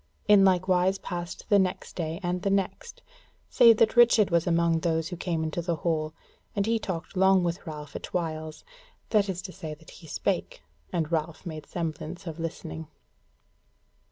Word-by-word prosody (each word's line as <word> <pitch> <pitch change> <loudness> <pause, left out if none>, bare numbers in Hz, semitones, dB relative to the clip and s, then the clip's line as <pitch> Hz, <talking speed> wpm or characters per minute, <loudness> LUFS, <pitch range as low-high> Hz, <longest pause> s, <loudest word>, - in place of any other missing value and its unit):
In 205 -2 +7
like 185 -1 +3
wise 185 +1 +3
passed 175 -2 -6
the 205 - +6
next 185 -1 -2
day 165 0 -3
and 180 0 -1
the 200 - 0
next, 195 - -2 0.5
save 230 -2 +7
that 220 +1 +3
Richard 230 -5 +6
was 170 0 +2
among 170 -1 +3
those 160 -1 0
who 180 - -5
came 170 -2 -2
into 160 +2 -2
the 170 0 -1
hall, 155 0 -1 0.4
and 200 -1 +1
he 225 +1 +1
talked 180 -3 -5
long 190 0 +5
with 170 +1 -3
Ralph 150 -2 -7
at - - -5
whiles; 160 -3 -3 0.5
that 210 -2 +3
is 180 -1 -3
to 190 - -6
say 160 -4 -7
that 160 +1 -16
he 165 - -13
spake, 110 - -2 0.3
and 165 -2 -1
Ralph 160 +2 -2
made 155 -3 -7
semblance 165 0 -5
of 165 -1 -6
listening. 80 - -5
175 Hz, 180 wpm, -27 LUFS, 160-190 Hz, 0.5 s, In